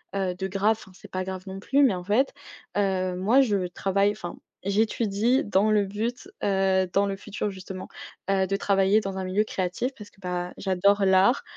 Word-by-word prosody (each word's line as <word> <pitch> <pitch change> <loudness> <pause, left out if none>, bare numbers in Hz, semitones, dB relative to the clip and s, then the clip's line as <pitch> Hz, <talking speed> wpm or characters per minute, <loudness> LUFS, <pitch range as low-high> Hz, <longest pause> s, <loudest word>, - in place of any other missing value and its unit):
heu, 185 -2 -1
de 190 +1 -3
grave, 200 +3 +1
enfin 195 - -14
c'est - - -15
pas 185 0 -2
grave 185 0 -5
non 190 0 -6
plus, 275 +8 +3
mais 260 - +5
en 180 - -6
fait, 220 +9 +2 0.4
heu, 185 -2 +1
moi 215 +9 +4
je 200 -8 +1
travaille 195 +3 +1
enfin 205 -4 -7 0.3
j'étudie 220 +4 +1
dans 205 +1 +2
le 205 -1 +3
but, 225 - -4 0.2
heu- 190 -1 +2
dans 200 +1 +3
le 195 - -2
futur 205 +1 -4
justement- 190 -1 -8 0.4
heu, 195 -1 +3
de 195 +1 -1
travailler 195 +1 +3
dans 195 -2 -4
un 190 - -2
milieu 190 +3 +1
créatif 185 +7 -2
parce 210 -1 -10
que, 200 - -27
bah, 180 -1 -3
j'adore 195 +1 +2
l'art, 190 +6 +4
195 Hz, 195 wpm, -26 LUFS, 190-210 Hz, 0.4 s, mais